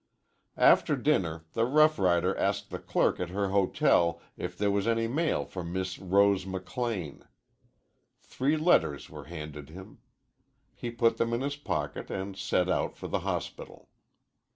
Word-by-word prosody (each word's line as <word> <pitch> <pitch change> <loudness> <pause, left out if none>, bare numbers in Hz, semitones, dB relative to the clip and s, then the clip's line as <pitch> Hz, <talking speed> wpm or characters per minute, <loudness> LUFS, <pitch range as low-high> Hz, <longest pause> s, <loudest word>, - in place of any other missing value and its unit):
After - - +5
dinner 80 -3 0
the 115 - +1
rough 155 +5 +4
rider 90 0 +2
asked - - -1
the - - -4
clerk - - +1
at 90 - -3
her 100 +1 -1
hotel 90 -3 +2 0.2
if 90 0 -6
there 100 0 +1
was 100 +1 0
any 115 0 +1
mail 155 +7 0
for 90 - -6
Miss 95 +2 -4
Rose 100 +1 +3
McLean. 95 - -4 1.0
Three 140 +4 -1
letters 155 - +2
were - - -9
handed 75 -1 -8
him. 95 +4 -12 0.7
He 120 - -5
put 115 0 +2
them 115 0 0
in 120 - 0
his 140 +1 -2
pocket 75 - -4
and 95 +1 -4
set 95 -2 0
out 90 - -1
for - - -6
the - - -1
hospital. - - -5
95 Hz, 155 wpm, -29 LUFS, 90-115 Hz, 1.0 s, After